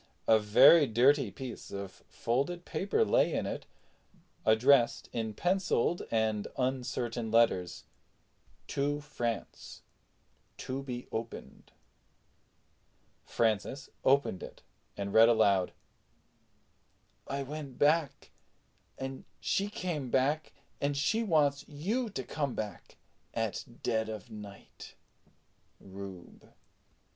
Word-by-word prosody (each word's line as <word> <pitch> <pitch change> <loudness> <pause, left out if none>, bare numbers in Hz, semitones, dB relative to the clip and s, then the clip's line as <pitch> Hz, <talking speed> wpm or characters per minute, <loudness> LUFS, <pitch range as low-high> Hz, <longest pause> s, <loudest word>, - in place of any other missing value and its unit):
A 110 -1 +6
very 120 +9 +7
dirty 130 +5 +4
piece 130 -3 -8
of 100 -1 -7
folded 140 +9 -1
paper 205 - 0
lay - - +3
in - - -1
it, - - -5 0.8
addressed 120 +3 +4
in 110 -2 -3
penciled 180 - +1
and 110 -2 0
uncertain 125 -3 -2
characters 110 -6 +2 0.8
TO 145 +1 -1
FRANCE 120 -7 -5 0.7
TO 130 +1 -4
BE 125 -2 -6
OPENED. 115 +1 -7 1.5
Francis 115 +4 -1
opened 135 -8 +2
it - - -10 0.3
and 100 0 -4
read 115 +1 +8
aloud: 100 -5 +3 1.6
"I 140 0 -2
went 140 -2 -7
back 150 -1 +1 0.7
and 135 0 -6 0.2
she 200 +1 0
came 170 -10 -3
back 145 +5 +1 0.3
and 140 0 0
she 220 +11 +1
wants 150 -9 +2
you 210 - -2
to 135 -10 -5
come 140 -1 -3
back 105 -2 -6 0.4
at 115 -3 -2 0.2
ded 110 -2 0
of 110 +2 -7
nite. 105 -2 -11 0.8
RUBE." 95 -2 -11
130 Hz, 100 wpm, -31 LUFS, 110-145 Hz, 1.6 s, read